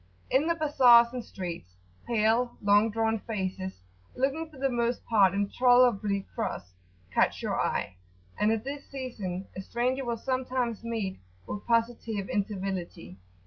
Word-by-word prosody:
In 285 Hz, +4 st, +3 dB
the 335 Hz, -, +2 dB
bazars 250 Hz, -6 st, +6 dB
and 250 Hz, -2 st, -4 dB
streets, 170 Hz, -, -7 dB, 0.3 s
pale 235 Hz, +2 st, +1 dB
long 205 Hz, +2 st, +4 dB
drawn 225 Hz, 0 st, 0 dB
faces, 190 Hz, -, -4 dB, 0.3 s
looking 280 Hz, +5 st, -1 dB
for 305 Hz, -, -15 dB
the 270 Hz, +1 st, +1 dB
most 240 Hz, -1 st, -1 dB
part 200 Hz, -5 st, +4 dB
intolerably 210 Hz, -2 st, +3 dB
cross, 90 Hz, -, -4 dB, 0.4 s
catch -, -, +2 dB
your -, -, 0 dB
eye, 90 Hz, -, -2 dB, 0.4 s
and 210 Hz, -, +2 dB
at 225 Hz, -1 st, -1 dB
this 280 Hz, +2 st, -7 dB
season 210 Hz, -9 st, -5 dB
a 190 Hz, -, -4 dB
stranger 250 Hz, +6 st, -1 dB
will 235 Hz, -2 st, -2 dB
sometimes 255 Hz, -2 st, -2 dB
meet 220 Hz, -5 st, -3 dB, 0.3 s
with 205 Hz, -, -6 dB
positive 230 Hz, -3 st, 0 dB
incivility. 195 Hz, -, -3 dB
225 Hz, 140 wpm, -28 LUFS, 200-250 Hz, 0.4 s, bazars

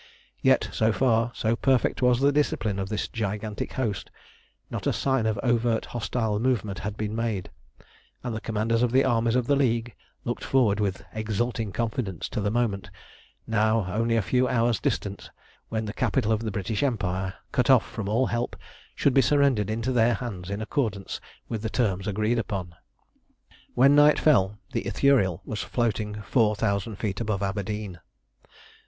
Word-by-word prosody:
Yet -, -, +4 dB
so 110 Hz, 0 st, +2 dB
far, 115 Hz, -1 st, +2 dB
so 110 Hz, +1 st, +1 dB
perfect 130 Hz, 0 st, +1 dB
was 125 Hz, -1 st, +4 dB
the 140 Hz, +1 st, +4 dB
discipline 115 Hz, -8 st, 0 dB
of 95 Hz, 0 st, -3 dB
this 105 Hz, -1 st, -2 dB
gigantic 105 Hz, -1 st, -4 dB
host, 105 Hz, -8 st, -2 dB, 0.6 s
not -, -, -3 dB
a -, -, +2 dB
sign 135 Hz, -5 st, +1 dB
of 110 Hz, -2 st, -1 dB
overt 120 Hz, -2 st, +1 dB
hostile 110 Hz, -2 st, -2 dB
movement 110 Hz, -5 st, 0 dB
had 105 Hz, +1 st, -5 dB
been 105 Hz, 0 st, -3 dB
made, 110 Hz, -5 st, -2 dB, 0.7 s
and 120 Hz, -3 st, -3 dB
the 110 Hz, -, -4 dB
commanders 115 Hz, +1 st, 0 dB
of 125 Hz, -1 st, +2 dB
the 130 Hz, +2 st, +4 dB
armies 115 Hz, -2 st, +2 dB
of 125 Hz, -2 st, +2 dB
the 140 Hz, -, +3 dB
League 120 Hz, -4 st, +1 dB, 0.3 s
looked -, -, -3 dB
forward 115 Hz, -6 st, +2 dB
with 100 Hz, -3 st, -1 dB
exulting 110 Hz, 0 st, -2 dB
confidence 110 Hz, -5 st, -2 dB
to -, -, -3 dB
the 105 Hz, -, 0 dB
moment, 110 Hz, -3 st, -1 dB, 0.6 s
now 110 Hz, -1 st, +2 dB
only 115 Hz, +1 st, +1 dB
a 115 Hz, -, +2 dB
few 125 Hz, +4 st, +2 dB
hours 115 Hz, -4 st, +2 dB
distant, -, -, -3 dB, 0.4 s
when 110 Hz, -1 st, -2 dB
the 105 Hz, -, -5 dB
capital 115 Hz, -3 st, 0 dB
of 110 Hz, -, +2 dB
the 115 Hz, -, -2 dB
British 100 Hz, +1 st, -2 dB
Empire, 95 Hz, -7 st, -1 dB, 0.2 s
cut 125 Hz, -2 st, +1 dB
off 130 Hz, -3 st, +6 dB
from 100 Hz, -2 st, -5 dB
all 115 Hz, +5 st, +2 dB
help, 120 Hz, 0 st, -2 dB, 0.4 s
should 140 Hz, -, +2 dB
be 135 Hz, -, +6 dB
surrendered 135 Hz, -8 st, +3 dB
into 115 Hz, +4 st, -1 dB
their 120 Hz, -1 st, +3 dB
hands 100 Hz, -6 st, -6 dB
in 100 Hz, +2 st, -3 dB
accordance 110 Hz, -6 st, -2 dB, 0.3 s
with 110 Hz, -3 st, -4 dB
the 110 Hz, -, -2 dB
terms 100 Hz, -5 st, 0 dB
agreed 110 Hz, +4 st, +1 dB
upon. 95 Hz, -4 st, -4 dB, 1.0 s
When 135 Hz, +3 st, +6 dB
night 145 Hz, +1 st, +6 dB
fell 105 Hz, -9 st, +3 dB
the -, -, -2 dB
Ithuriel 120 Hz, -, +2 dB
was 105 Hz, -2 st, -4 dB
floating 105 Hz, -3 st, -2 dB
four 110 Hz, -1 st, +2 dB
thousand 100 Hz, 0 st, -1 dB
feet 100 Hz, +1 st, -3 dB
above 105 Hz, -3 st, -1 dB
Aberdeen. 100 Hz, -1 st, -3 dB
110 Hz, 170 wpm, -26 LUFS, 105-120 Hz, 1.0 s, off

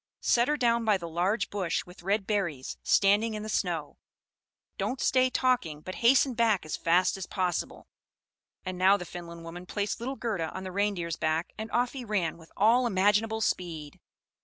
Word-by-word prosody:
Set 240 Hz, 0 st, +3 dB
her 300 Hz, 0 st, +1 dB
down 235 Hz, -3 st, +2 dB
by 215 Hz, -3 st, +3 dB
the 170 Hz, -2 st, -7 dB
large 185 Hz, +6 st, 0 dB
bush 190 Hz, -5 st, -1 dB
with 180 Hz, +1 st, -14 dB
red 195 Hz, +2 st, 0 dB
berries, 175 Hz, -11 st, -2 dB
standing 210 Hz, +3 st, +3 dB
in 210 Hz, -, -5 dB
the 215 Hz, -, -6 dB
snow; 170 Hz, -7 st, -2 dB, 0.8 s
don't 260 Hz, -, -2 dB
stay 255 Hz, +1 st, +3 dB
talking, 250 Hz, -, 0 dB
but 185 Hz, -, -7 dB
hasten 255 Hz, +2 st, +5 dB
back 225 Hz, -6 st, +2 dB
as 155 Hz, -, -3 dB
fast 180 Hz, +3 st, +2 dB
as 190 Hz, -, -6 dB
possible." 180 Hz, -4 st, -2 dB, 0.8 s
And 185 Hz, -1 st, -4 dB
now 190 Hz, +2 st, +5 dB
the 180 Hz, -, -7 dB
Finland 170 Hz, -1 st, -9 dB
woman 175 Hz, +2 st, -9 dB
placed 205 Hz, +3 st, -2 dB
little 260 Hz, +4 st, -4 dB
Gerda 200 Hz, -11 st, -2 dB
on 190 Hz, -, -5 dB
the 185 Hz, -, -6 dB
Reindeer's 180 Hz, -4 st, -1 dB
back, 160 Hz, +1 st, -1 dB
and 220 Hz, +1 st, -6 dB
off 245 Hz, +1 st, 0 dB
he 265 Hz, -2 st, -6 dB
ran 190 Hz, -7 st, -1 dB
with 160 Hz, -, -16 dB
all 235 Hz, +4 st, +4 dB
imaginable 210 Hz, +2 st, +2 dB
speed. 160 Hz, -8 st, -3 dB
195 Hz, 185 wpm, -28 LUFS, 175-225 Hz, 0.8 s, hasten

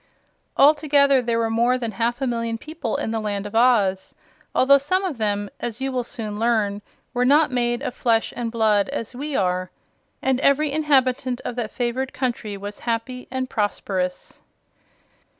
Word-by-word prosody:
Altogether 285 Hz, -2 st, +5 dB
there 235 Hz, -1 st, 0 dB
were 225 Hz, -1 st, 0 dB
more 240 Hz, +3 st, +2 dB
than 235 Hz, -3 st, -3 dB
half 235 Hz, +5 st, -1 dB
a -, -, +1 dB
million 230 Hz, -2 st, -2 dB
people 300 Hz, -2 st, -4 dB
in -, -, -2 dB
the 225 Hz, -, -1 dB
Land 205 Hz, -2 st, -3 dB
of 205 Hz, -, -7 dB
Oz 220 Hz, -5 st, +2 dB, 0.4 s
although 280 Hz, +2 st, +6 dB
some 370 Hz, +8 st, 0 dB
of 305 Hz, -10 st, -4 dB
them, 205 Hz, -1 st, 0 dB
as 235 Hz, -2 st, -4 dB
you 270 Hz, 0 st, -2 dB
will 250 Hz, -1 st, -1 dB
soon 215 Hz, -4 st, -6 dB
learn, 215 Hz, -3 st, +1 dB, 0.3 s
were 245 Hz, 0 st, +1 dB
not 290 Hz, +3 st, +4 dB
made 240 Hz, +1 st, 0 dB
of 250 Hz, -, -3 dB
flesh 230 Hz, -3 st, +1 dB
and 235 Hz, -2 st, -3 dB
blood 215 Hz, -2 st, +2 dB
as 260 Hz, -4 st, -4 dB
we 285 Hz, +2 st, -4 dB
are 185 Hz, -2 st, 0 dB, 0.5 s
and 265 Hz, -1 st, +1 dB
every 280 Hz, +2 st, +3 dB
inhabitant 260 Hz, -4 st, +1 dB
of 245 Hz, -, -3 dB
that 230 Hz, -3 st, -2 dB
favored 255 Hz, +2 st, -2 dB
country 240 Hz, -5 st, -3 dB
was 205 Hz, +1 st, -7 dB
happy 245 Hz, +2 st, -3 dB
and 260 Hz, 0 st, -3 dB
prosperous. 195 Hz, -5 st, -3 dB
240 Hz, 170 wpm, -23 LUFS, 220-265 Hz, 0.5 s, although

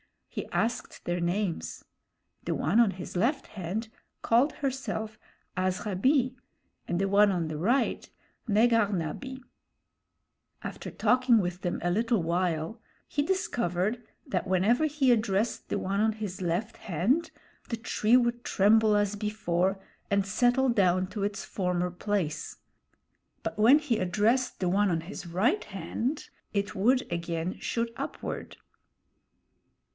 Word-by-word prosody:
He -, -, -5 dB
asked 235 Hz, -, -2 dB
their 175 Hz, 0 st, -1 dB
names. 175 Hz, +1 st, -2 dB, 0.6 s
The -, -, 0 dB
one 175 Hz, +10 st, +2 dB
on 230 Hz, -4 st, +5 dB
his 185 Hz, 0 st, -8 dB
left 255 Hz, -, +1 dB
hand 205 Hz, +4 st, -4 dB, 0.3 s
called 245 Hz, +6 st, +3 dB
herself 220 Hz, -5 st, -3 dB, 0.4 s
Azhabee, 210 Hz, +8 st, +1 dB, 0.5 s
and 175 Hz, -, -1 dB
the 195 Hz, 0 st, +1 dB
one 205 Hz, +1 st, +5 dB
on 170 Hz, -4 st, -1 dB
the 155 Hz, -, -4 dB
right, 235 Hz, -, +1 dB, 0.4 s
Negahna 210 Hz, -7 st, +2 dB
bee. 265 Hz, -1 st, -8 dB, 1.2 s
After -, -, -6 dB
talking 250 Hz, +2 st, +3 dB
with 180 Hz, -1 st, -2 dB
them 175 Hz, -, -2 dB
a 175 Hz, -, +1 dB
little 225 Hz, 0 st, +1 dB
while, 170 Hz, +3 st, -1 dB, 0.3 s
he 290 Hz, -, 0 dB
discovered 240 Hz, -, 0 dB, 0.2 s
that 265 Hz, -, -2 dB
whenever 200 Hz, -, +3 dB
he 290 Hz, -4 st, +2 dB
addressed 215 Hz, -1 st, +1 dB
the -, -, -1 dB
one 195 Hz, +1 st, -1 dB
on 220 Hz, +1 st, +3 dB
his 210 Hz, -4 st, -6 dB
left 185 Hz, +6 st, -1 dB
hand, 215 Hz, -, 0 dB, 0.4 s
the 230 Hz, -, -2 dB
tree 225 Hz, 0 st, +2 dB
would 240 Hz, -1 st, 0 dB
tremble 215 Hz, +2 st, +4 dB
as 205 Hz, 0 st, +1 dB
before 195 Hz, -3 st, 0 dB, 0.3 s
and 200 Hz, -1 st, +2 dB
settle 245 Hz, +6 st, +2 dB
down 185 Hz, -5 st, +3 dB
to 195 Hz, +1 st, -4 dB
its 200 Hz, 0 st, -2 dB
former 180 Hz, -2 st, -1 dB
place; 175 Hz, -5 st, -2 dB, 0.9 s
but -, -, -4 dB
when 240 Hz, +7 st, +7 dB
he 290 Hz, -7 st, 0 dB
addressed 215 Hz, +8 st, +1 dB
the 180 Hz, -, +2 dB
one 200 Hz, +2 st, +3 dB
on 165 Hz, -2 st, 0 dB
his 180 Hz, +1 st, -8 dB
right 215 Hz, -, +1 dB
hand, 215 Hz, -, -3 dB, 0.2 s
it 200 Hz, -1 st, -1 dB
would 240 Hz, +6 st, +3 dB
again 170 Hz, +1 st, -3 dB
shoot 230 Hz, 0 st, -2 dB
upward. -, -, -5 dB
205 Hz, 135 wpm, -28 LUFS, 180-235 Hz, 1.2 s, when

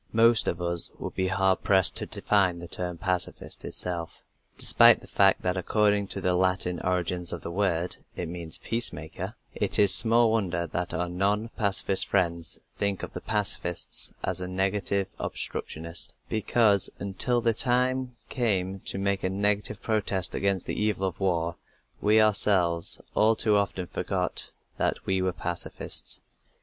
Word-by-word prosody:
Most 115 Hz, 0 st, +4 dB
of -, -, -1 dB
us 85 Hz, -1 st, 0 dB
would -, -, -6 dB
be 95 Hz, -, -1 dB
hard 95 Hz, 0 st, +1 dB
pressed 95 Hz, -3 st, +6 dB
to -, -, -3 dB
define 95 Hz, -4 st, +1 dB
the 85 Hz, 0 st, -9 dB
term 90 Hz, 0 st, -3 dB
"pacifist" 90 Hz, +1 st, -3 dB
itself. 85 Hz, -2 st, -5 dB, 0.3 s
Despite -, -, +6 dB
the -, -, -15 dB
fact 95 Hz, -1 st, +3 dB
that 90 Hz, 0 st, 0 dB
according 105 Hz, +2 st, +1 dB
to -, -, -3 dB
the 90 Hz, -, +1 dB
Latin 90 Hz, -1 st, 0 dB
origins 90 Hz, -1 st, -1 dB
of -, -, -6 dB
the 85 Hz, -, -5 dB
word 90 Hz, -2 st, -1 dB, 0.2 s
it 90 Hz, -, -4 dB
means 85 Hz, -1 st, -6 dB
"peace 115 Hz, +1 st, +1 dB
maker," 80 Hz, +1 st, -7 dB, 0.2 s
it -, -, 0 dB
is 100 Hz, -2 st, +6 dB
small 115 Hz, 0 st, +5 dB
wonder 95 Hz, -6 st, -1 dB
that 85 Hz, +2 st, -4 dB
our 90 Hz, -, -2 dB
non 100 Hz, +5 st, -1 dB
pacifist 100 Hz, -3 st, 0 dB
friends 85 Hz, -4 st, 0 dB, 0.2 s
think 100 Hz, -2 st, 0 dB
of -, -, -7 dB
the -, -, -6 dB
pacifist 100 Hz, -5 st, 0 dB
as 90 Hz, 0 st, -2 dB
a 90 Hz, -, -4 dB
negative 95 Hz, +1 st, -1 dB
obstructionist, 80 Hz, 0 st, -4 dB
because 110 Hz, -2 st, +3 dB
until 100 Hz, +5 st, -1 dB
the 115 Hz, -1 st, +1 dB
time 125 Hz, +1 st, 0 dB
came 95 Hz, -6 st, -1 dB
to -, -, -3 dB
make 100 Hz, 0 st, 0 dB
a 95 Hz, -, 0 dB
negative 105 Hz, +1 st, -1 dB
protest 100 Hz, -4 st, 0 dB
against 100 Hz, -2 st, 0 dB
the -, -, -4 dB
evil 105 Hz, -3 st, 0 dB
of 90 Hz, -, -7 dB
war 85 Hz, -3 st, -1 dB, 0.4 s
we 105 Hz, +1 st, +4 dB
ourselves 95 Hz, -5 st, +4 dB
all 110 Hz, +1 st, +3 dB
too 110 Hz, -1 st, +2 dB
often 100 Hz, -2 st, -1 dB
forgot -, -, -3 dB, 0.3 s
that -, -, -1 dB
we 95 Hz, -1 st, 0 dB
were 95 Hz, 0 st, 0 dB
pacifists. 90 Hz, -1 st, -3 dB
95 Hz, 160 wpm, -26 LUFS, 90-105 Hz, 0.4 s, pressed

